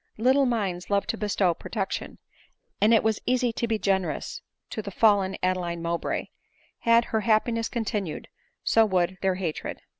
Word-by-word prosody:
Little 260 +4 +4
minds 195 -7 -2
love 200 -1 +2
to 230 - -2
bestow 205 -4 +1
protection; - - -4 0.6
and 210 +2 +5
it 225 - +5
was 220 -1 +1
easy 250 -2 +2
to 235 - -2
be 225 -1 +1
generous 190 -3 -1 0.3
to 220 - -3
the 200 - -6
fallen 200 -2 +3
Adeline 180 -2 0
Mowbray; 170 0 -2 0.5
had 230 0 +4
her 220 -1 -1
happiness 230 +1 +1
continued, 210 -8 -3 0.4
so 225 - +4
would 185 -3 0
their 190 -1 +1
hatred. 175 -4 -4
210 Hz, 155 wpm, -26 LUFS, 185-230 Hz, 0.6 s, and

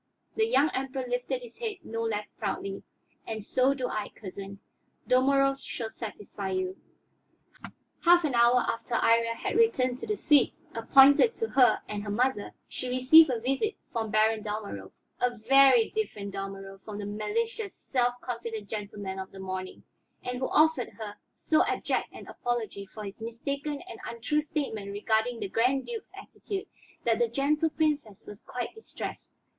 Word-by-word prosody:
The 440 0 +2
young 310 - +3
Emperor 265 0 -3
lifted 245 +1 -2
his 240 -1 -13
head 450 -3 -3
no 230 -3 -4
less 210 -2 -2
proudly. 195 -2 -4 0.5
"And 220 -2 -4
so 260 +5 +2
do 255 -2 -2
I, 215 -3 -3
cousin. 195 -1 -9 0.5
Dalmorov 275 +1 +3
shall 225 -4 -5
satisfy 205 -3 -6
you." 185 0 -2 1.3
Half 350 0 +6
an 295 -4 0
hour 240 +1 +5
after 230 +1 -2
Iría 230 0 +3
had 375 - -2
returned 255 - +3
to - - -6
the 425 -1 -1
suite 295 -5 +4 0.2
appointed 275 - +6
to 450 - -2
her 255 -2 +4
and 210 -1 -4
her 205 - -6
mother, 240 0 0 0.2
she 255 - -5
received 260 +5 +7
a 245 -3 0
visit 270 - 0 0.2
from 225 -2 -1
Baron 215 +1 +3
Dalmorov 205 - -5 0.3
a 245 -1 0
very 260 +1 +5
different 210 - -3
Dalmorov 195 0 -6
from 210 -2 -7
the 205 - -5
malicious, 415 - -2
self 245 -1 0
confident 230 -4 -5
gentleman 205 -2 -5
of 190 - -6
the 195 - -11
morning, 185 0 -5 0.4
and 250 0 -3
who 260 - 0
offered 310 -5 +3
her 215 -2 -6 0.2
so 310 - +3
abject - - -1
an - - -10
apology 225 -5 -3
for 215 +2 -9
his 200 +2 -8
mistaken 280 +6 -4
and - - -9
untrue 235 +6 0
statement 265 -10 -3
regarding 220 +3 0
the - - -3
Grand 250 +7 +1
Duke's 460 -2 -7
attitude, 395 -3 -6 0.4
that 230 -1 +2
the 240 - +3
Gentle 290 +6 +1
Princess 295 -10 -1
was 205 -1 -10
quite 245 -1 -5
distressed. 445 - -7
240 Hz, 160 wpm, -28 LUFS, 210-275 Hz, 1.3 s, received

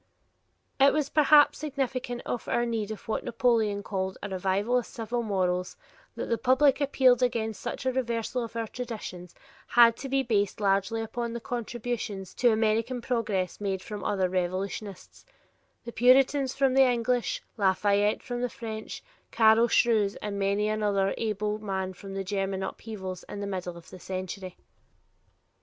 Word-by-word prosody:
It 275 +1 +6
was 300 -1 -1
perhaps 300 -1 +5
significant 260 -4 -3
of 240 - -4
our 240 - +1
need 225 -3 -2
of 215 - -8
what 220 - -2
Napoleon 225 -4 +1
called 190 -2 -3
a 205 - -4
"revival 195 +6 +1
of 245 - -7
civic 235 0 -3
morals" 180 -3 -1 0.4
that - - -3
the 230 - 0
public 265 +3 +3
appeal 265 -2 +5
against 225 -3 -1
such - - -5
a 260 - +2
reversal 240 -1 -1
of 230 0 -8
our 230 -1 -1
traditions 215 -7 -7 0.3
had 235 -1 +6
to 270 - -6
be 270 0 +1
based 205 -5 0
largely 200 +3 +1
upon 235 +1 -4
the 235 - -4
contributions 235 -5 -4
to 245 -2 +3
American 225 +3 +1
progress 215 -7 -2
made 190 -2 -2
from 210 -2 -7
other 190 -2 +1
revolutions; 185 +2 -4 0.6
the 235 - -6
Puritans 265 +2 +4
from 270 -1 +2
the 270 - +5
English, 245 -1 +1
Lafayette 205 +1 +2
from 245 -1 -4
the 250 - 0
French, 220 -2 -7 0.3
Carl 225 +1 +5
Schurz 220 -4 +3
and 205 -1 -5
many 200 +2 +1
another 205 -2 +1
able 210 -1 -2
man 190 -3 -3
from 195 +1 -9
the 195 - -2
German 195 0 -2
upheavals 190 -4 -6
in 205 - -6
the 200 - -3
middle 180 -3 -4
of 170 - -14
the 185 - -10
century. 185 0 -6
220 Hz, 160 wpm, -28 LUFS, 195-245 Hz, 0.6 s, It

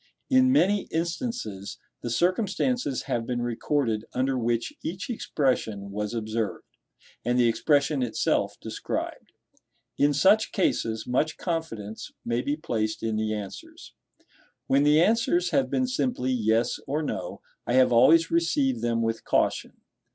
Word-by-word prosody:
In 260 0 +5
many 205 -6 +3
instances, 165 - -3 0.2
the 120 - -4
circumstances 185 - 0
have 115 -1 -2
been 120 -1 -1
recorded 120 -1 -1
under 130 +1 0
which 120 -1 -1
each 185 +8 -4
expression 110 - -1
was 105 +3 -3
observed, 110 -2 -3 0.6
and 120 +1 +1
the 120 -1 +4
expression 140 +4 +2
itself 120 -3 0
described. - - -5 0.7
In 145 +1 +4
such 200 +9 +4
cases, 110 - 0
much 150 +6 0
confidence 135 - -4
may 120 +1 0
be 145 +3 -2
placed 110 -8 -2
in 110 -1 -1
the 110 0 -1
answers. 100 -2 -9 0.7
When 135 +1 +3
the 150 +1 +5
answers 180 -2 +2
have 275 - +2
been 260 - +1
simply 250 - -1
yes 115 -1 +1
or 150 +3 -1
no, 95 -10 -4 0.3
I 120 - 0
have 130 -1 +5
always 160 +8 +5
received 145 -8 +1
them 115 -1 0
with 115 0 -2
caution. - - 0
130 Hz, 135 wpm, -26 LUFS, 115-170 Hz, 0.7 s, In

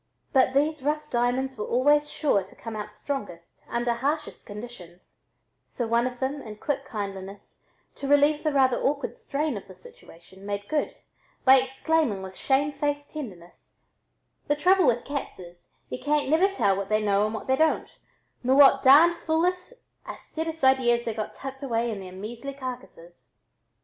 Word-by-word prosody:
But 260 -1 +3
these 300 +1 +1
rough 300 +2 -2
diamonds 245 +1 0
were 210 - -2
always 290 +4 +3
sure 280 -10 +1
to 190 - -14
come 225 -1 -8
out 210 -1 -6
strongest 205 -12 -6
under 240 0 0
hardest 290 +6 -3
conditions, 205 -5 -11 0.4
so 240 - -4
one 235 +2 +2
of 245 -1 -7
them, 275 +2 -2
in 215 -4 -9
quick 275 +4 -3
kindliness, 195 -2 -7 0.3
to 275 - -5
relieve 290 +1 +4
the 305 - +1
rather 265 -3 +3
awkward 280 +1 -1
strain 290 -3 -2
of 200 - -10
the 190 - -13
situation, 185 +1 -16
"made 205 0 -4
good" 310 +11 -1 0.5
by 265 0 +8
exclaiming 265 -4 0
with 190 0 -9
shame 280 +5 +1
faced 290 0 -2
tenderness: 190 - -10 0.7
"The 290 - +2
trouble 365 +2 +4
with 240 -1 +1
cats 280 0 -5
is, 175 -1 -14 0.2
y'u - - -5
can't 295 -1 +1
never 325 +6 +4
tell 295 - +1
what 195 0 -4
they 215 0 +3
know 200 0 +2
and 215 - -4
what 220 - -6
they 265 - +2
don't, 315 +3 +1 0.5
nor 255 +1 +2
what 275 -1 +7
darned 320 +6 +7
foolish 360 +5 0 0.4
audasus 320 -1 -6
ideas 245 -3 +3
they 230 - -2
got 215 -1 -5
tucked 270 0 -8
away 235 -3 -1
in 210 - -5
their 185 -1 -9
measly 235 +8 -7
carcasses." 175 - -9
260 Hz, 170 wpm, -26 LUFS, 210-290 Hz, 0.7 s, by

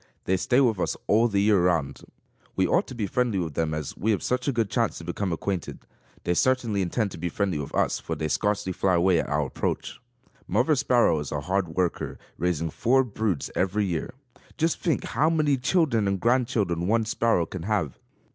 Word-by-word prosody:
They 95 - +2
stay 120 +7 +2
with 115 -7 +2
us - - -1
all 115 +3 +4
the 100 -3 +1
year 105 -3 +4
round. 80 -6 0 0.5
We 95 - +2
ought 180 - +2
to 130 - -8
be 110 -3 -1
friendly 120 +1 0
with 85 -4 -2
them 80 +1 -1
as 75 -2 -4
we 110 - -2
have 105 - +1
such 125 +1 -1
a - - +3
good 115 -4 0
chance - - 0
to - - -8
become 100 -3 -3
acquainted. 90 +2 -3 0.5
They 90 - +1
certainly 115 -1 +1
intend 100 +3 -1
to - - -9
be 90 +1 -2
friendly 95 -3 -1
with 70 - -6
us - - +1
for - - -4
they 80 - -2
scarcely 105 +2 0
fly 95 0 +1
away 85 0 +3
at - - -3
our 75 0 +1
approach. - - -3 0.5
Mother 125 - +2
Sparrow 125 - +3
is 75 - -5
a 75 - -2
hard 90 0 -1
worker, 90 -2 -1 0.2
raising 85 -2 -1
four 130 +8 +3
broods 110 - -2
every 95 +3 +1
year. 90 +7 -3 0.4
Just 165 +1 +1
think 165 - 0
how 155 +2 +1
many 155 -3 +2
children 135 - +1
and 100 -1 0
grand 120 +4 +2
children 90 -8 -1
one 115 +1 +2
sparrow 115 -5 +1
can 95 +2 -7
have! 95 -7 -1
100 Hz, 210 wpm, -26 LUFS, 85-120 Hz, 0.5 s, all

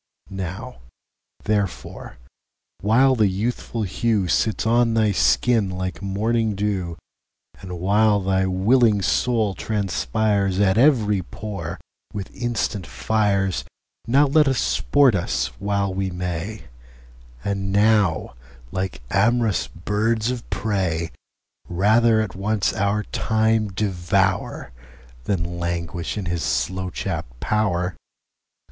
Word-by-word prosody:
Now 95 -8 -6 0.6
therefore, 100 -3 -3 0.6
while 130 +6 +4
the 110 -4 +3
youthful 110 +3 -2
hewSits 105 +1 0
on 115 0 +3
thy 110 -2 +3
skin 95 - +2
like 95 -2 -4
morning 110 +2 0
[dew]And 95 -1 -6
while 105 +3 +3
thy 95 0 +1
willing 105 +2 +3
Soul 110 0 +1
transpiresAt 100 - 0
every 115 -7 +4
pore 100 +3 -6 0.3
with 100 -2 -6
instant 115 -7 -2
Fires, 100 -1 0 0.4
Now 135 +5 +5
let 150 +1 +4
us 135 -2 +2
sport 140 0 +3
us 90 -3 -1
while 100 -1 -1
we 95 0 -1
may; 90 +3 -4 0.8
And 100 -1 -2
now, 100 -7 +2 0.4
like 95 -8 -4
am'rous 110 +2 +2
birds 110 +6 -1
of 125 -2 -6
prey, 95 -5 -1 0.6
Rather 110 +5 +3
at 110 -4 -3
once 100 +1 0
our 100 +2 0
Time 110 0 +1
devour, 95 - -1 0.5
Than 85 -3 -2
languish 85 +1 -3
in 100 - -3
his 85 0 -2
slow 90 +10 -1
chapt - - -5
pow'r. 90 - 0
100 Hz, 105 wpm, -22 LUFS, 95-110 Hz, 0.8 s, Now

